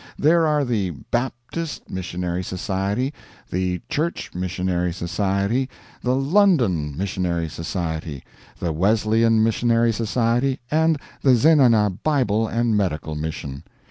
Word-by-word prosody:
There 165 Hz, +2 st, +4 dB
are 150 Hz, -2 st, +2 dB
the 105 Hz, -7 st, 0 dB, 0.2 s
Baptist 130 Hz, +6 st, -3 dB
Missionary 90 Hz, -1 st, -3 dB
Society, 95 Hz, -, -2 dB, 0.4 s
the 90 Hz, 0 st, -1 dB
Church 165 Hz, +4 st, -2 dB
Missionary 90 Hz, 0 st, -1 dB
Society, 100 Hz, +8 st, -1 dB, 0.3 s
the 125 Hz, +1 st, +1 dB
London 135 Hz, -, +2 dB
Missionary 90 Hz, -3 st, -1 dB
Society, 80 Hz, -3 st, -4 dB, 0.4 s
the 85 Hz, -2 st, -1 dB
Wesleyan 110 Hz, +5 st, +3 dB
Missionary 115 Hz, +1 st, +2 dB
Society, 120 Hz, +4 st, 0 dB
and 160 Hz, 0 st, +3 dB, 0.2 s
the 130 Hz, -2 st, +5 dB
Zenana 115 Hz, -, +4 dB
Bible 115 Hz, -8 st, +2 dB
and 115 Hz, 0 st, +1 dB
Medical 85 Hz, -6 st, -1 dB
Mission. 75 Hz, -3 st, -5 dB
105 Hz, 110 wpm, -22 LUFS, 90-130 Hz, 0.4 s, the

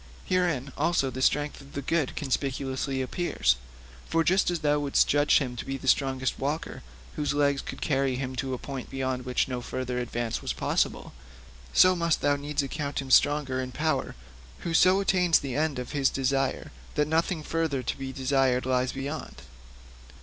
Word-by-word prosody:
Herein 170 Hz, -8 st, 0 dB
also 140 Hz, -6 st, +1 dB
the 130 Hz, -, -5 dB
strength 145 Hz, +2 st, +1 dB
of 140 Hz, 0 st, -15 dB
the 140 Hz, -, -3 dB
good 155 Hz, -1 st, 0 dB
conspicuously 135 Hz, -1 st, -2 dB
appears. 125 Hz, -, +1 dB, 0.5 s
For 165 Hz, 0 st, +2 dB
just 185 Hz, +3 st, +3 dB
as 175 Hz, -2 st, -2 dB
thou 150 Hz, -1 st, +2 dB
wouldst 145 Hz, -1 st, +2 dB
judge 145 Hz, +1 st, +4 dB
him 125 Hz, -4 st, -2 dB
to -, -, -4 dB
be 135 Hz, -, -4 dB
the 135 Hz, -, -9 dB
strongest 130 Hz, -1 st, +1 dB
walker 145 Hz, +4 st, -3 dB, 0.4 s
whose 145 Hz, -1 st, 0 dB
legs 140 Hz, -1 st, +2 dB
could -, -, -8 dB
carry 135 Hz, -3 st, +1 dB
him 130 Hz, 0 st, -4 dB
to 130 Hz, -1 st, -2 dB
a -, -, -6 dB
point 135 Hz, 0 st, -7 dB
beyond 130 Hz, -1 st, -3 dB
which 125 Hz, -1 st, +1 dB
no 125 Hz, -2 st, -3 dB
further 125 Hz, 0 st, -3 dB
advance 120 Hz, -1 st, -3 dB
was -, -, -2 dB
possible, -, -, -1 dB, 0.6 s
so 185 Hz, 0 st, +6 dB
must 170 Hz, -2 st, +1 dB
thou 145 Hz, 0 st, +3 dB
needs 145 Hz, +1 st, -2 dB
account 140 Hz, +1 st, -3 dB
him 135 Hz, -1 st, -5 dB
strong 145 Hz, +1 st, +5 dB
in 130 Hz, -1 st, -2 dB
power 150 Hz, 0 st, -1 dB, 0.5 s
who 170 Hz, -, -3 dB
so 185 Hz, +4 st, +5 dB
attains 180 Hz, -4 st, +4 dB
the 135 Hz, -3 st, -4 dB
end 150 Hz, -1 st, 0 dB
of 125 Hz, -1 st, -5 dB
his 140 Hz, -2 st, +2 dB
desires 135 Hz, 0 st, -1 dB, 0.2 s
that 150 Hz, -1 st, +2 dB
nothing 160 Hz, +1 st, 0 dB
further 160 Hz, -5 st, -1 dB
to -, -, -2 dB
be 135 Hz, -1 st, -5 dB
desired 130 Hz, -1 st, +1 dB
lies 130 Hz, 0 st, +1 dB
beyond. 135 Hz, -, -6 dB
140 Hz, 180 wpm, -27 LUFS, 130-150 Hz, 0.6 s, so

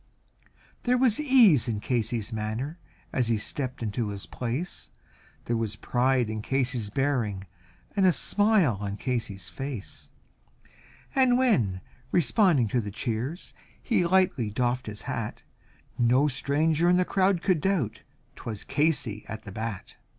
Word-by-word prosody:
There 250 Hz, 0 st, +2 dB
was 245 Hz, -2 st, +3 dB
ease 240 Hz, -, +5 dB
in 110 Hz, -3 st, -1 dB
Casey's 115 Hz, -1 st, -1 dB
manner 110 Hz, +10 st, -3 dB, 0.3 s
as 125 Hz, -3 st, +1 dB
he 115 Hz, -1 st, +2 dB
stepped 125 Hz, +3 st, -4 dB
into 110 Hz, 0 st, -2 dB
his 100 Hz, -3 st, -6 dB
place, 130 Hz, -, -4 dB, 0.6 s
There 120 Hz, -, 0 dB
was 110 Hz, -2 st, -2 dB
pride 125 Hz, +1 st, +1 dB
in 110 Hz, 0 st, -4 dB
Casey's 125 Hz, -3 st, -1 dB
bearing 115 Hz, -6 st, -1 dB, 0.5 s
and 195 Hz, -2 st, +4 dB
a -, -, +6 dB
smile 205 Hz, -, +3 dB
on 100 Hz, 0 st, -4 dB
Casey's 115 Hz, -8 st, -3 dB
face, 135 Hz, -6 st, -6 dB, 1.0 s
And 255 Hz, -2 st, +4 dB
when 120 Hz, -, +2 dB, 0.3 s
responding 170 Hz, -, +3 dB
to 120 Hz, +3 st, +1 dB
the 105 Hz, -, -5 dB
cheers 120 Hz, -, -4 dB, 0.3 s
he 230 Hz, -7 st, +1 dB
lightly 170 Hz, -, +2 dB
doffed 125 Hz, +3 st, -1 dB
his 105 Hz, -2 st, -6 dB
hat, -, -, -4 dB, 0.6 s
No 125 Hz, +4 st, +4 dB
stranger 150 Hz, +5 st, +1 dB
in 180 Hz, -, +5 dB
the 180 Hz, -, +2 dB
crowd 190 Hz, -2 st, +2 dB
could 180 Hz, -5 st, +2 dB
doubt, 170 Hz, -, 0 dB, 0.3 s
'twas 110 Hz, -3 st, -6 dB
Casey 140 Hz, -8 st, 0 dB
at 110 Hz, -, -7 dB
the 100 Hz, -, -9 dB
bat. 110 Hz, -1 st, -6 dB
125 Hz, 140 wpm, -27 LUFS, 110-175 Hz, 1.0 s, a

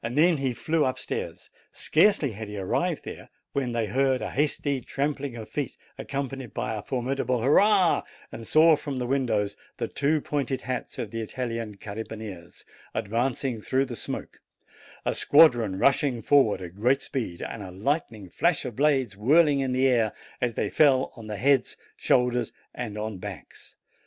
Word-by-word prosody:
Then 150 Hz, +8 st, +3 dB
he 135 Hz, -3 st, -1 dB
flew 160 Hz, +5 st, +1 dB
up 130 Hz, -2 st, 0 dB
stairs. -, -, -5 dB, 0.2 s
Scarcely 160 Hz, -, +3 dB
had 110 Hz, +1 st, -7 dB
he 105 Hz, 0 st, -7 dB
arrived 95 Hz, -1 st, -1 dB
there -, -, -8 dB, 0.2 s
when 130 Hz, -3 st, -1 dB
they 115 Hz, -1 st, 0 dB
heard 130 Hz, +4 st, +1 dB
a -, -, -4 dB
hasty 140 Hz, -1 st, 0 dB
trampling 140 Hz, 0 st, -3 dB
of 110 Hz, -2 st, -7 dB
feet, 145 Hz, -2 st, -4 dB, 0.2 s
accompanied 135 Hz, -3 st, -5 dB
by -, -, -2 dB
a 105 Hz, -, -4 dB
formidable 130 Hz, 0 st, -1 dB
hurrah, 190 Hz, -, +4 dB, 0.3 s
and 115 Hz, -1 st, -8 dB
saw 160 Hz, +1 st, +6 dB
from 145 Hz, -2 st, -5 dB
the 125 Hz, -, -2 dB
windows 115 Hz, -6 st, 0 dB, 0.2 s
the -, -, -2 dB
two 150 Hz, +2 st, +1 dB
pointed 140 Hz, -3 st, -2 dB
hats 130 Hz, -1 st, -4 dB
of 105 Hz, -, -4 dB
the 115 Hz, -, -3 dB
Italian 115 Hz, -2 st, -4 dB
carabineers 105 Hz, -4 st, -8 dB, 0.3 s
advancing 120 Hz, +2 st, -1 dB
through 135 Hz, +5 st, +1 dB
the 125 Hz, -3 st, -6 dB
smoke, -, -, -6 dB, 0.7 s
a -, -, +1 dB
squadron 120 Hz, -10 st, +5 dB
rushing 135 Hz, 0 st, +2 dB
forward 115 Hz, -9 st, +3 dB
at 85 Hz, -1 st, -8 dB
great 125 Hz, +6 st, +2 dB
speed, 115 Hz, -11 st, -4 dB
and 115 Hz, -, -6 dB
a 95 Hz, -, -7 dB
lightning 110 Hz, -, -2 dB
flash 165 Hz, -, +1 dB
of 125 Hz, -4 st, -5 dB
blades 135 Hz, -6 st, +2 dB
whirling 145 Hz, -, +4 dB
in 135 Hz, -1 st, 0 dB
the 130 Hz, +1 st, +3 dB
air, 115 Hz, -4 st, +2 dB, 0.3 s
as 120 Hz, -3 st, 0 dB
they -, -, 0 dB
fell 135 Hz, -4 st, +4 dB
on 110 Hz, -3 st, -10 dB
heads, 125 Hz, +5 st, +1 dB, 0.2 s
shoulders, 125 Hz, -2 st, +1 dB, 0.2 s
and 110 Hz, -4 st, -5 dB
on 105 Hz, -2 st, -4 dB
backs. -, -, -10 dB
125 Hz, 165 wpm, -26 LUFS, 110-140 Hz, 0.7 s, saw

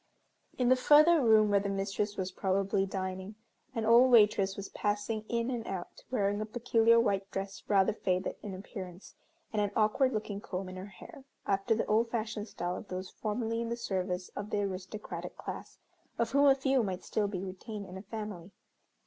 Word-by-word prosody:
In 250 Hz, -1 st, +2 dB
the 255 Hz, -, +7 dB
further 300 Hz, +5 st, +6 dB
room 215 Hz, -3 st, +5 dB
where 200 Hz, -, +5 dB
the 200 Hz, 0 st, -2 dB
mistress 200 Hz, +1 st, -2 dB
was 185 Hz, 0 st, -2 dB
probably 195 Hz, +1 st, 0 dB
dining, 190 Hz, +1 st, -4 dB, 0.4 s
an 225 Hz, -1 st, -1 dB
old 235 Hz, +3 st, +7 dB
waitress 205 Hz, -4 st, +5 dB
was 200 Hz, -1 st, -5 dB
passing 210 Hz, +1 st, -2 dB
in 235 Hz, +1 st, 0 dB
and 235 Hz, -3 st, -4 dB
out, 185 Hz, -2 st, -6 dB
wearing 205 Hz, -4 st, 0 dB
a -, -, -1 dB
peculiar 230 Hz, 0 st, +3 dB
white 200 Hz, -3 st, +1 dB
dress 195 Hz, 0 st, -5 dB
rather 195 Hz, -2 st, +4 dB
faded 185 Hz, -3 st, -1 dB
in 200 Hz, -3 st, -6 dB
appearance, 185 Hz, -1 st, -9 dB, 0.4 s
and 210 Hz, -, +1 dB
an 205 Hz, -, +1 dB
awkward 225 Hz, +5 st, +3 dB
looking 210 Hz, -3 st, -3 dB
comb 185 Hz, -1 st, -5 dB
in 185 Hz, -, -8 dB
her 185 Hz, +2 st, -7 dB
hair, 200 Hz, +7 st, -13 dB, 0.2 s
after 200 Hz, +3 st, +1 dB
the 225 Hz, -, 0 dB
old 225 Hz, +2 st, +2 dB
fashioned 220 Hz, -2 st, -3 dB
style 175 Hz, -2 st, -3 dB
of 215 Hz, -, -9 dB
those 185 Hz, +1 st, -5 dB
formerly 225 Hz, +1 st, -2 dB
in 230 Hz, -, -3 dB
the 235 Hz, -, -2 dB
service 185 Hz, -4 st, -2 dB
of 205 Hz, -, -6 dB
the 205 Hz, -, 0 dB
aristocratic 195 Hz, +2 st, -6 dB
class, -, -, -7 dB, 0.4 s
of 235 Hz, -, 0 dB
whom 280 Hz, +1 st, +5 dB
a 270 Hz, -, +7 dB
few 270 Hz, -1 st, +2 dB
might 190 Hz, -4 st, -3 dB
still 210 Hz, -2 st, 0 dB
be 190 Hz, -2 st, -4 dB
retained 200 Hz, +2 st, -6 dB
in 185 Hz, -, -10 dB
a 190 Hz, -, -6 dB
family. 210 Hz, -4 st, -7 dB
205 Hz, 190 wpm, -31 LUFS, 195-230 Hz, 0.4 s, the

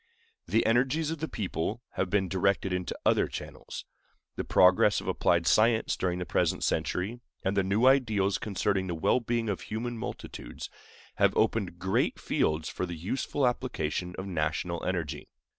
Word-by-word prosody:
The 115 Hz, -, +2 dB
energies 130 Hz, +7 st, +2 dB
of 165 Hz, -, -4 dB
the 160 Hz, -, -2 dB
people 105 Hz, -, -3 dB
have 95 Hz, -, -2 dB
been 95 Hz, 0 st, +2 dB
directed 95 Hz, +1 st, +1 dB
into 90 Hz, 0 st, -3 dB
other -, -, +4 dB
channels. -, -, -7 dB, 0.5 s
The -, -, -2 dB
progress 90 Hz, 0 st, +5 dB
of -, -, -9 dB
applied 85 Hz, -1 st, +2 dB
science 110 Hz, +6 st, +3 dB
during 90 Hz, -1 st, -1 dB
the 90 Hz, -, -3 dB
present -, -, 0 dB
century, 105 Hz, +7 st, -1 dB, 0.2 s
and 95 Hz, +1 st, 0 dB
the 100 Hz, -, +4 dB
new 100 Hz, +6 st, +1 dB
ideals 110 Hz, -8 st, +3 dB
concerning 100 Hz, -2 st, 0 dB
the 85 Hz, -, -2 dB
well 80 Hz, +9 st, +2 dB
being 120 Hz, -1 st, -1 dB
of 100 Hz, -6 st, -2 dB
human 115 Hz, +2 st, -4 dB
multitudes, -, -, -7 dB, 0.5 s
have -, -, +3 dB
opened 95 Hz, -6 st, +1 dB
great 95 Hz, +2 st, 0 dB
fields 75 Hz, 0 st, 0 dB
for 90 Hz, -, -3 dB
the 85 Hz, -, -5 dB
useful 130 Hz, -, -1 dB
application 90 Hz, -8 st, -2 dB
of 95 Hz, -, -4 dB
national 85 Hz, -1 st, -2 dB
energy. 85 Hz, -5 st, -3 dB
95 Hz, 160 wpm, -29 LUFS, 90-115 Hz, 0.5 s, progress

